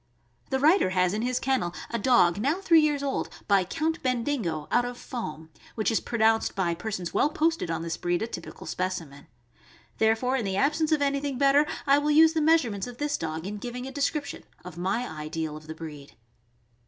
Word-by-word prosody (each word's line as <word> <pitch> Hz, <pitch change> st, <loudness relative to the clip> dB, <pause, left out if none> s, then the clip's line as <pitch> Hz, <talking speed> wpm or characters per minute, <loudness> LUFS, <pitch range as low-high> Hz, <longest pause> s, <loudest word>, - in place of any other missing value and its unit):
The 265 Hz, -, +1 dB
writer 310 Hz, -, +4 dB
has 185 Hz, 0 st, +1 dB
in 215 Hz, -, -1 dB
his 250 Hz, +1 st, 0 dB
kennel 255 Hz, -10 st, -1 dB, 0.2 s
a 235 Hz, -, -1 dB
dog, 200 Hz, -6 st, +4 dB
now 285 Hz, -, 0 dB
three 335 Hz, -4 st, +5 dB
years 295 Hz, -2 st, +1 dB
old, 275 Hz, -1 st, -2 dB, 0.2 s
by 200 Hz, -2 st, +4 dB
Count 315 Hz, -, -2 dB
Bendigo, 235 Hz, -, -1 dB
out -, -, +3 dB
of 245 Hz, 0 st, -5 dB
Foam, 160 Hz, -12 st, -7 dB, 0.2 s
which 220 Hz, 0 st, 0 dB
is 225 Hz, -, +2 dB
pronounced 225 Hz, -1 st, +1 dB
by 180 Hz, -3 st, 0 dB
persons 180 Hz, -1 st, -5 dB
well 290 Hz, -, +3 dB
posted 320 Hz, -, 0 dB
on 165 Hz, 0 st, -2 dB
this 165 Hz, -1 st, -3 dB
breed 175 Hz, +3 st, -1 dB
a -, -, 0 dB
typical 175 Hz, -7 st, -8 dB
specimen; 170 Hz, -6 st, -4 dB, 0.7 s
there 220 Hz, 0 st, +4 dB
fore, 255 Hz, +3 st, -1 dB
in 240 Hz, -, -2 dB
the 190 Hz, -1 st, -1 dB
absence 305 Hz, +5 st, +1 dB
of 300 Hz, -2 st, +3 dB
anything 280 Hz, -1 st, -1 dB
better, 280 Hz, +2 st, +4 dB, 0.2 s
I 280 Hz, 0 st, +5 dB
will 295 Hz, +1 st, -1 dB
use 320 Hz, +2 st, +6 dB
the 320 Hz, -, +1 dB
meas 320 Hz, +1 st, +5 dB
urements 205 Hz, -4 st, -4 dB
of 245 Hz, -1 st, -9 dB
this 290 Hz, +1 st, -1 dB
dog 160 Hz, +1 st, -4 dB
in 205 Hz, +2 st, -4 dB
giving* 245 Hz, +2 st, -6 dB
a 265 Hz, -, -6 dB
description 285 Hz, +1 st, -2 dB, 0.2 s
of 180 Hz, -3 st, -8 dB
my 195 Hz, +8 st, -1 dB
ideal 155 Hz, 0 st, -5 dB
of 155 Hz, 0 st, -11 dB
the 160 Hz, -, -7 dB
breed. 150 Hz, -3 st, -9 dB
235 Hz, 205 wpm, -27 LUFS, 175-285 Hz, 0.7 s, use